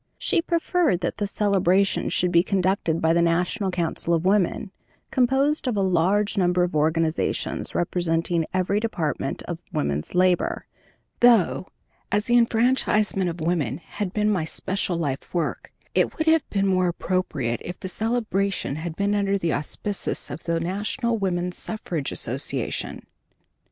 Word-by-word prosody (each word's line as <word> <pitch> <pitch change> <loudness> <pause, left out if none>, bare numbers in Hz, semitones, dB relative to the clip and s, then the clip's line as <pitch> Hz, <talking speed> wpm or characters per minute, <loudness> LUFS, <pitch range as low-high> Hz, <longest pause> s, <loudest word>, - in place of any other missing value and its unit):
She - - +1
preferred 335 - +1
that 175 - -3
this 205 -1 -1
celebration 195 -2 +2
should 180 0 0
be 170 -1 +5
conducted 185 -3 0
by 160 0 +3
the 170 - +3
National 180 +4 +1
Council 170 -1 0
of 165 +2 -2
Women, 195 0 +1 0.4
composed 270 +4 +2
of 235 -4 0
a 195 - +2
large 190 +4 +2
number 180 -1 +3
of 175 -3 -2
organizations 160 +1 0
representing 170 -1 0
every 185 +2 +1
department 175 -9 -2
of - - -5
woman's 70 - -2
labor, 180 0 +2 0.5
though, 230 -6 +4 0.4
as 205 +2 +1
the 240 - +2
enfranchisement 225 -5 +2
of 170 0 -6
woman 155 -7 0
had 185 +2 -5
been 210 +1 +1
my 185 -6 0
special 180 +2 -1
life 140 -5 -3
work, 170 -3 -2 0.2
it - - +1
would 315 - 0
have 320 -1 +3
been 195 -1 0
more 185 -2 +2
appropriate 170 -9 -2
if 175 - -7
the - - -5
celebration 200 - 0
had 160 0 -5
been 200 +2 0
under 200 -1 +1
the 170 -4 -1
auspices 195 +7 -2
of 155 - -8
the 165 0 0
National 215 +7 -1
Woman's 180 -2 -1
Suffrage 175 -9 -3
Association. - - -2
185 Hz, 150 wpm, -24 LUFS, 170-210 Hz, 0.5 s, be